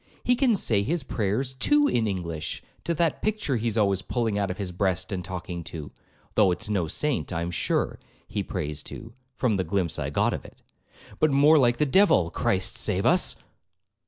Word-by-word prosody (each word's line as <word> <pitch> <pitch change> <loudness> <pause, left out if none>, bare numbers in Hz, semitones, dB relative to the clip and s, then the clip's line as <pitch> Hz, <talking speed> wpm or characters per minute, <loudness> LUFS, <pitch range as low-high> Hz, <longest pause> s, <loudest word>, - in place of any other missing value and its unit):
—He 245 - +3
can 245 -3 +3
say 110 - +1
his 160 +11 -1
prayers 115 +5 -1
too 295 - +3
in 115 -2 +1
English 85 -5 -4 0.2
to 170 - 0
that 165 -1 0
picture 210 - 0
he's 115 0 -1
always 100 -3 +2
pulling 110 +2 -1
out 100 -2 0
of 90 - -4
his 95 -3 -4
breast 95 0 -1
and 90 -2 -3
talking 90 -1 -6
to, 80 -2 -7 0.4
though 105 -3 +4
it's 95 +4 -2
no 95 -6 0
saint, 145 - -1
I 85 -1 -2
am 85 - -3
sure, 85 - -1 0.3
he - - -3
prays 75 0 -4
to, 115 0 -9 0.2
(from 115 -6 +1
the 95 - 0
glimpse 90 -2 -1
I - - -2
got - - +1
of - - -5
it), - - -16 0.6
but 155 - +4
more 145 +3 +5
like 120 -2 +3
the 150 - +2
devil,—Christ 95 - +2
save - - 0
us!' - - +4
105 Hz, 190 wpm, -26 LUFS, 90-135 Hz, 0.6 s, more